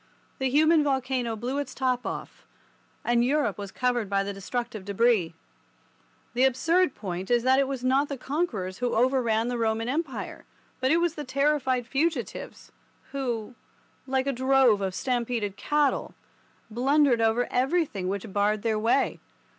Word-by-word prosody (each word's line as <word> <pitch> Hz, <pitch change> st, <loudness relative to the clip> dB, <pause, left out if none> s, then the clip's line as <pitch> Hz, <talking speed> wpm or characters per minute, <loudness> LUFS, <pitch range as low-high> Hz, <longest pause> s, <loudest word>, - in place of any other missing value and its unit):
The 265 Hz, -1 st, +1 dB
human 310 Hz, +3 st, +4 dB
volcano 260 Hz, -4 st, -1 dB
blew 250 Hz, +6 st, -3 dB
its 275 Hz, -2 st, -5 dB
top 255 Hz, -1 st, 0 dB
off, -, -, -7 dB, 0.6 s
and 240 Hz, 0 st, +3 dB
Europe 260 Hz, -6 st, +1 dB
was 200 Hz, -1 st, -6 dB
covered 245 Hz, -4 st, 0 dB
by 195 Hz, -1 st, +1 dB
the 200 Hz, 0 st, -4 dB
destructive 225 Hz, +2 st, -4 dB
debris. 200 Hz, -4 st, +1 dB, 1.0 s
The 245 Hz, +2 st, +2 dB
absurd 320 Hz, +5 st, +2 dB
point 190 Hz, -2 st, -5 dB
is 240 Hz, -1 st, +3 dB
that 260 Hz, +1 st, +4 dB
it 275 Hz, -, +2 dB
was 265 Hz, -2 st, -4 dB
not 270 Hz, +3 st, +2 dB
the 280 Hz, -, -4 dB
conquerors 245 Hz, -, -3 dB
who 245 Hz, -1 st, -1 dB
overran 235 Hz, -2 st, +2 dB
the 245 Hz, -1 st, -2 dB
Roman 225 Hz, 0 st, 0 dB
Empire, 285 Hz, +1 st, -3 dB, 0.4 s
but 260 Hz, 0 st, +1 dB
it 320 Hz, -, +4 dB
was 340 Hz, -1 st, +1 dB
the 300 Hz, -, -6 dB
terrified 265 Hz, -2 st, +1 dB
fugitives, 280 Hz, 0 st, -3 dB, 0.4 s
who, 245 Hz, -4 st, -3 dB, 0.5 s
like 265 Hz, 0 st, 0 dB
a 275 Hz, -, 0 dB
drove 260 Hz, -4 st, +3 dB
of 190 Hz, -1 st, -2 dB
stampeded 235 Hz, -5 st, -1 dB
cattle, 295 Hz, +3 st, 0 dB, 0.6 s
blundered 265 Hz, +1 st, +3 dB
over 225 Hz, +2 st, +2 dB
everything 260 Hz, -, 0 dB
which 200 Hz, +1 st, -4 dB
barred 205 Hz, +1 st, +1 dB
their 220 Hz, -2 st, +1 dB
way. 235 Hz, +5 st, +1 dB
250 Hz, 155 wpm, -27 LUFS, 220-275 Hz, 1.0 s, human